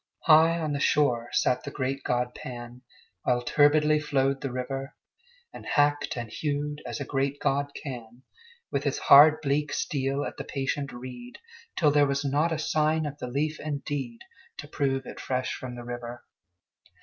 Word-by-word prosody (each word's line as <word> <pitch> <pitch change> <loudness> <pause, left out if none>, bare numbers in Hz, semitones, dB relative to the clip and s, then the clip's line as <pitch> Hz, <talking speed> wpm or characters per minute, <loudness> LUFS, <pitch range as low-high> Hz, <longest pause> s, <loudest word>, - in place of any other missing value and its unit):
High 165 +1 +6
on 155 -2 -2
the 140 - -2
shore 125 -5 +2
sat 125 0 +2
the - - -5
great 135 -1 -3
god 125 0 -1
Pan 120 0 -8 0.4
While 125 -1 +1
turbidly 150 +3 +4
flowed 135 -2 0
the 135 - -3
river; 135 +3 -4 0.6
And - - -10
hacked 145 -2 +1
and 115 -2 -5
hewed 145 0 -3
as 120 - -4
a - - -4
great 140 +1 -1
god 140 +1 0
can, 125 -3 -8 0.5
With - - -1
his - - 0
hard 150 +2 +8
bleak 145 +1 0
steel 140 0 -1
at - - -6
the - - -4
patient 140 0 -3
reed, 125 0 -9 0.4
Till 155 -5 +4
there 145 0 +4
was 140 +1 -1
not 145 +5 +1
a 160 - 0
sign 155 0 +1
of 145 0 -6
the 125 - -4
leaf 150 +5 -2
indeed 140 -5 -4 0.4
To - - -8
prove 135 -2 -1
it - - -9
fresh 130 -1 -2
from 125 -1 -7
the 120 - -8
river. 120 0 -7
140 Hz, 175 wpm, -27 LUFS, 125-145 Hz, 0.6 s, hard